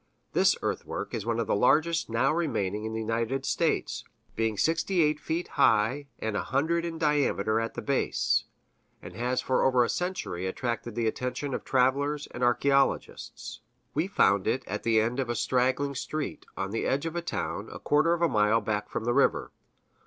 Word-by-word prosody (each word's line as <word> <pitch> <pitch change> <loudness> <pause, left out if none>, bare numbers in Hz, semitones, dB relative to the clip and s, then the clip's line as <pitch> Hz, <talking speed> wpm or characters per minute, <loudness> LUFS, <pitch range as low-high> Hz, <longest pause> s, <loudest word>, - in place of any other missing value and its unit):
This - - +4
earthwork - - -3
is 110 -1 -4
one 115 0 0
of 115 - 0
the 105 - +1
largest 155 +9 +2
now 125 +6 +2
remaining 105 - -1
in 110 - -4
the 110 - -2
United 115 +4 -1
States, - - 0 0.3
being 110 -2 0
sixty 165 - +2
eight 150 0 +1
feet 165 +3 -3
high 115 +7 +2
and 110 -2 -3
a - - 0
hundred 165 +6 0
in 165 -1 -4
diameter 145 -9 +1
at 115 0 -3
the - - -5
base, 140 -1 +1 0.5
and - - -11
has 125 +2 -1
for 130 - +1
over 130 -2 +4
a 120 - -1
century 180 - -2
attracted 115 +2 -3
the 120 -1 0
attention 125 +5 -2
of - - -3
travelers 140 +3 +1
and 120 - -7
archæologists. 135 +3 0 0.3
We 160 +5 0
found 100 - +3
it 130 - 0
at 105 +2 -4
the 115 -1 +3
end 115 +4 0
of 130 -3 -1
a 120 - 0
straggling 130 +3 +1
street, 150 +3 -4
on 95 0 -3
the 115 - -1
edge 140 +4 0
of 165 - -3
the 175 - -2
town, 170 - -4
a - - -7
quarter 155 +3 +2
of 170 0 -1
a - - +5
mile 105 -3 +3
back 105 -1 -2
from - - -3
the 120 +1 +1
river. 140 - +2
125 Hz, 190 wpm, -28 LUFS, 115-150 Hz, 0.5 s, a